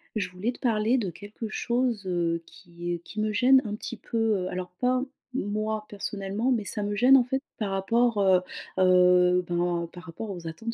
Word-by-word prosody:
Je 200 -4 -1
voulais 185 +7 -3
te - - -15
parler 230 +1 +2
de 205 -6 -1
quelque 205 +5 -8
chose, 235 -3 -1
heu, 170 -2 0
qui 175 +1 -7
et 170 - -3
qui 210 +5 -9
me 215 0 0
gêne 260 +5 +5
un 210 -1 -3
petit 235 - -7
peu, 230 - -5 0.3
heu. - - -2
Alors, 180 0 -5
pas 255 +1 +2 0.3
moi, 215 -1 -2
personnellement, 205 +4 -2
mais 225 -3 -1
ça 210 - -4
me 205 0 -2
gêne 255 +5 +7
en 250 - +3
fait 265 +2 -1 0.2
par 210 -3 -2
rapport, 225 +3 +1
heu 190 -2 +5 0.4
heu, 180 0 +5
ben 175 -1 0
par 180 0 -11
rapport 190 +6 -6
aux 175 -3 -7
attentes 225 +9 -5
205 Hz, 200 wpm, -27 LUFS, 180-230 Hz, 0.4 s, gêne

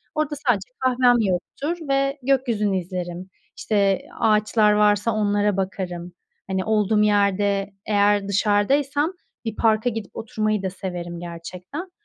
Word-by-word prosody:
Orada 305 -1 -1
sadece 215 -1 +1
kahvem 255 -1 +4
yoktur 215 - -2
ve 275 +1 +1
gökyüzünü 235 -7 +1
izlerim. 180 0 -5 0.3
İşte, 200 -3 +1 0.2
ağaçlar 215 0 +3
varsa 210 +1 +3
onlara 205 -1 +1
bakarım. 180 -2 -4 0.3
Hani, 190 -1 -1
olduğum 215 -1 +2
yerde 200 -1 +1
eğer 205 -1 +2
dışarıdaysam 270 - +1 0.3
bir 220 -1 -3
parka 220 +1 +2
gidip 225 -3 -6
oturmayı 215 -2 -1
da 190 - 0
severim 175 -2 -6
gerçekten. 180 - -8
205 Hz, 120 wpm, -23 LUFS, 190-230 Hz, 0.3 s, kahvem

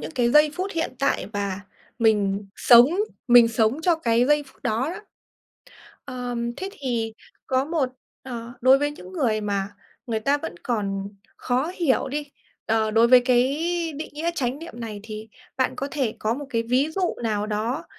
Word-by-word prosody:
những 150 +1 -6
cái 240 -1 +2
giây 300 +1 +6
phút 375 +3 -3
hiện 330 -4 -1
tại 275 -8 0
và 200 -1 -3 0.4
mình 205 -3 +2
sống 240 0 +8 0.4
mình 240 -1 +8
sống 230 +5 +1
cho 345 -1 +4
cái 235 -6 +2
giây 295 0 +3
phút 265 - -21
đó 240 +8 0
đó. 365 - -7 1.0
Ờ, 250 -2 -5 0.2
thế 380 +5 -4
thì 235 - -3 0.3
có 260 0 +1
một 305 -3 0 0.3
ờ, 240 -2 -7
đối 260 +2 +6
với 290 +1 0
những 295 - -11
người 240 -11 0
mà 200 -1 -2 0.4
người 225 -3 -1
ta 280 +6 +2
vẫn 230 - -6
còn 200 -4 -2 0.3
khó 260 +6 -1
hiểu 315 -9 +1
đi, 295 +2 -3 0.4
ờ, 220 -1 +1
đối 225 +2 +5
với 255 0 +8
cái 245 0 +3 0.5
định 310 - -5
nghĩa 320 +3 -2
chánh 265 -3 -1
niệm 335 +1 -9
này 215 -3 -6
thì 215 0 -8 0.3
bạn 260 -1 +1
có 275 - -3
thể 260 -7 -1
có 220 +2 0
một 285 +2 -7
cái 230 -1 0
ví 250 +5 +1
dụ 370 -2 0
nào 210 -2 -1
đó 225 +9 -2
245 Hz, 185 wpm, -24 LUFS, 220-290 Hz, 1.0 s, sống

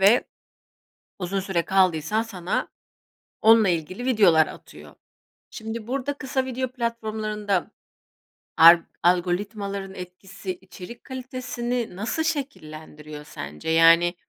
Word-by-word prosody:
ve 205 +6 +5 0.9
uzun 195 +1 -2
süre 190 -3 -1
kaldıysan 190 +2 +2
sana 190 -5 -3 0.7
onunla 220 -1 +6
ilgili 175 +6 -2
videolar 195 -11 +5
atıyor. - - -13 0.6
Şimdi, 220 0 -7
burada 275 +2 -2
kısa 265 -1 -2
video 260 0 -2
platformlarında 215 -5 -2 0.9
al 170 +1 +9 0.2
algoritmaların 195 +3 0
etkisi 185 +2 -7
içerik 190 +5 -11
kalitesini 250 -3 -4
nasıl 220 - -2
şekillendiriyor 155 - -6
sence? 75 - -7
Yani, 165 +2 +5
200 Hz, 95 wpm, -24 LUFS, 175-235 Hz, 0.9 s, al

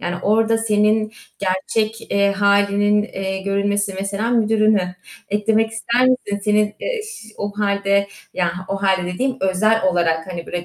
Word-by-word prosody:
Yani 175 0 -3
orada 225 +2 +2
senin 215 0 +1 0.3
gerçek, 205 +4 -1
eee, 200 0 +3
halinin, 200 +1 +3
eee, 190 -2 -4
görülmesi, 200 0 0
mesela 200 +4 -2
müdürünü, 215 -5 +2 0.3
eklemek 220 +2 +1
ister 235 +2 -1
misin? 205 -5 0
Senin, 210 0 +2
eee, - - -2
ş 430 - -10
o 205 0 -4
halde, 200 -1 +1 0.3
ya 175 -2 +1 0.2
o 195 0 -3
halde 190 -2 +2
dediğim, 260 +5 -1
özel 215 +4 +2
olarak, 170 -3 +1
hani, 170 -1 -6
böyle, 175 -1 -4
205 Hz, 145 wpm, -20 LUFS, 195-220 Hz, 0.3 s, eee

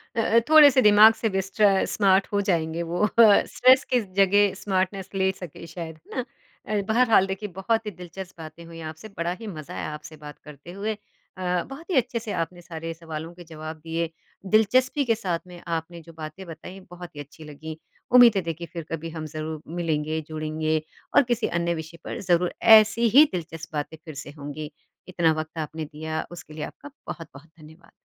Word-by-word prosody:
अ, 230 - +2
अ, 230 +1 +4
थोड़े 310 -2 +9
से 260 - +4
दिमाग 210 +1 +8
से 195 -4 +1
स्ट्र 195 +1 +3 0.2
स्मार्ट 195 -1 +4
हो 200 - +2
जाएँगे 165 0 0
वो 195 +4 +2
स्ट्रेस 250 +4 +6
की 245 - +4 0.2
जगह 200 +1 +4
स्मार्टनैस 190 -1 -1
ले 190 0 +2
सके 170 -1 -9
शायद। 160 -1 -8
है 255 - -1
ना? - - -9 0.5
अ, - - 0
बहरहाल 225 -5 +4
देखिए, 195 +2 -4
बहुत 225 +3 0
ही 210 - -3
दिलचस्प 180 +1 -9
बातें 160 +2 -10
हुई 165 0 -11
आपसे। 160 +8 -12
बड़ा 170 +1 -1
ही 220 - -7
मज़ा 155 -7 -8
आया - - -4
आपसे 150 +1 -9
बात 150 - -10
करते 150 +4 -12
हुए। 215 +1 -1
अ, 185 -3 -5
बहुत 330 +6 -12
ही - - +1
अच्छे 245 -1 +1
से 215 -2 -6
आपने 175 +1 -11
सारे 165 -1 -6
सवालों 165 0 -7
के 175 0 -12
जवाब 155 0 -7
दिए। 165 0 -1 0.5
दिलचस्पी 255 +6 +3
के - - +4
साथ 170 -3 0
में 175 -1 -11 0.2
आपने 170 +1 -8
जो 165 - -12
बातें 155 +5 -7
बताई, 170 +3 -10
बहुत 175 -3 -10
ही - - -8
अच्छी 155 +2 -15
लगी। 160 +2 -8 0.4
उम्मीद 235 -4 +8
है 195 - +2
देखिए, 170 +1 -8
फिर 170 -2 -5
कभी 165 0 -4
हम 155 - -4
ज़रूर 155 0 -5 0.2
मिलेंगे, 155 -1 -1
जुड़ेंगे 155 0 -1 0.3
और 285 - +7
किसी 235 0 +1
अन्य 170 0 0
विषय 165 +1 -12
पर - - -5
ज़रूर 175 0 +3 0.2
ऐसी 220 +2 +3
ही 305 - +10
दिलचस्प 165 -2 -7
बातें 160 +2 -6
फिर 155 - -8
से 145 - -9
होंगी। 145 +2 -6 0.4
इतना 170 -3 +2
वक्त 160 +1 -11
आपने 155 +1 -6
दिया 155 +1 -5
उसके 170 -3 -10
लिए 155 - -5
आपका 290 - -13 0.2
बहुत-बहुत 160 -2 -9
धन्यवाद। 160 +3 -16
175 Hz, 195 wpm, -25 LUFS, 160-205 Hz, 0.5 s, ही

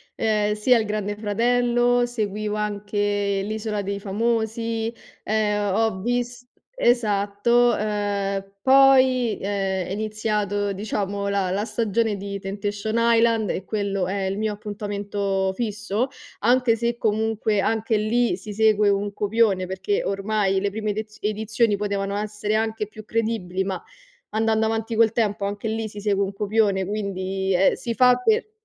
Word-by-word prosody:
ehm, 210 -1 +1
sia 235 +3 +4
il 220 - -1
Grande 210 -1 -2
Fratello, 240 +3 +2
seguivo 215 -2 -2
anche 205 -1 -1
L'isola 215 0 -3
dei 200 +1 -3
famosi, 225 +2 -1 0.3
ehm, 210 -2 0
ho 220 -3 +1
vis 245 +2 -2 0.3
esatto, 235 - +2
uhm, 200 -2 -2
poi 260 -3 +5
è 195 -2 -1
è - - -6
iniziato, 210 -1 -1
diciamo, 200 0 -3
la 200 -2 0
la 200 +2 0
stagione 225 -1 0
di 200 0 -5
Temptation 205 +2 -3
Island 230 -2 +3
e 190 - -4
quello 200 -3 -1
è 195 +1 -2
il 195 +2 -2
mio 215 -1 0
appuntamento 205 -2 -2
fisso, 215 +1 -2 0.3
anche 245 +1 +3
se 235 +1 -1
comunque 220 -1 0
anche 220 +1 +1
lì, 230 +3 +1
si 215 - -9
segue 210 0 +3
un 200 0 0
copione, 205 -3 +1
perché 190 +2 -1
ormai 195 -1 0
le 200 0 -1
prime 215 +1 -3
ediz 215 +1 -6
edizioni 215 +1 +1
potevano 200 -1 -2
essere 210 0 -2
anche 220 -1 -1
più 215 +1 -11
credibili, 215 -5 -1
ma 190 -2 -4 0.5
andando 220 0 +2
avanti 225 +1 -1
col 225 -1 +4
tempo 215 -3 0
anche 205 +2 -3
lì 220 0 -2
si 205 - -9
segue 200 -1 +1
un 195 0 -3
copione, 200 -1 +1
quindi 195 -1 -2
ehm, 190 +2 +4
si 235 - -4
fa 250 +1 +5
per 430 - +1
210 Hz, 145 wpm, -23 LUFS, 200-225 Hz, 0.5 s, poi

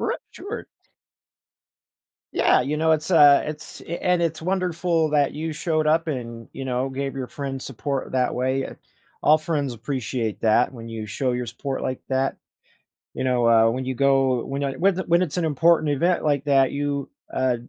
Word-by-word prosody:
R - - -1
sure. - - -7 1.7
Yeah, - - +4
you 150 +4 -2
know, 160 0 +3
it's, 155 +3 -1
uh, 145 -5 +7
it's 150 0 -8
eh, 170 - -4
and 180 -1 +2
it's 160 -1 -1
wonderful 175 -3 0
that 145 -2 +2
you 160 +1 -3
showed 155 0 -1
up 165 +2 +2
and, 115 -5 -5
you 135 - -5
know, 130 0 -1
gave 135 +1 -4
your 130 -2 -4
friends 135 -1 -5
support 135 +1 -4
that 125 -1 +1
way, 130 +2 0
eh, - - -8 0.5
all 155 - +6
friends 155 -5 -2
appreciate 120 -2 -3
that 115 +3 +3
when 115 -2 -9
you 115 -1 -5
show 125 +6 -1
your 125 0 -2
support 130 +4 -4
like 130 -1 -3
that. 135 0 0 0.8
You - - -4
know, 125 -2 +2
uh, 115 -1 +5
when 130 +2 -3
you 130 0 -2
go 135 -2 +2
when 140 +1 -3
a 135 -1 -1
whe 195 +3 +3
th 185 +1 -4
when 170 +1 +4
it's 180 -1 -2
an 170 - +1
important 155 +1 +3
event 170 +6 +1
like 145 -2 +1
that, 135 -2 +3
you, 140 -1 -2 0.2
uh, 130 -1 +1
140 Hz, 190 wpm, -23 LUFS, 130-155 Hz, 1.7 s, uh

